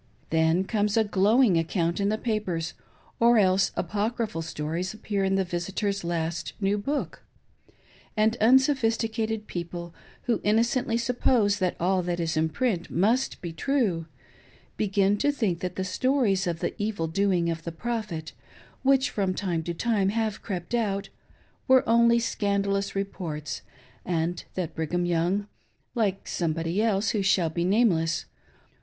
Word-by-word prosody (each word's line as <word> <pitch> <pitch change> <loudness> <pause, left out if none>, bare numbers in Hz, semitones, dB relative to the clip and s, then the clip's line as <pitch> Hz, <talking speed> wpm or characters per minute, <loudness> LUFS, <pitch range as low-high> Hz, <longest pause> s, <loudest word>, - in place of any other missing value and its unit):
Then 160 +3 +3
comes 210 +1 0
a 225 - +5
glowing 205 0 +4
account 170 +1 -1
in 200 0 +1
the 215 - 0
papers, 190 -8 -2 0.5
or 235 0 +5
else 190 -2 +3
apocryphal 210 0 -2
stories 165 +4 -3
appear 205 -2 -2
in 195 0 +2
the 195 - +2
visitor's 195 +3 -2
last 170 -1 -2
new 200 0 +1
book; 275 +8 -3 1.0
and 220 +1 +3
unsophisticated 225 -3 +2
people, 170 -1 -6 0.3
who 240 -2 0
innocently 230 +2 +2
suppose 235 -3 +2
that 185 -2 0
all 185 +2 +2
that 175 0 -2
is 165 -1 -1
in 160 +1 +1
print 180 0 -1
must 225 +9 +1
be 170 -2 -5
true, 195 - 0 0.7
begin 200 0 +2
to 290 - +3
think 210 -11 -1
that 180 0 -4
the 190 - -2
stories 200 -1 +1
of 170 -1 -2
the - - -1
evil 205 -5 -1
doing 175 0 +1
of 165 -1 -5
the 170 - -4
Prophet, 195 -5 -4 0.5
which 270 0 +3
from 190 -3 -1
time 175 -5 -1
to 170 - -2
time 205 0 +1
have 220 0 -1
crept 185 +1 -5
out, 200 -4 0 0.6
were 260 -1 +5
only 235 +1 +5
scandalous 200 -3 0
reports, 170 -7 -4 0.4
and 170 0 -2
that 180 -4 -3
Brigham 175 +3 -1
Young 175 +4 +1 0.3
— - - -45
like 195 -2 -1
Somebody 165 +3 -1
else 210 -2 +1
who 210 - 0
shall 190 -4 +2
be 170 +1 -1
name 210 +5 +4
less 165 0 -1
195 Hz, 150 wpm, -26 LUFS, 170-220 Hz, 1.0 s, a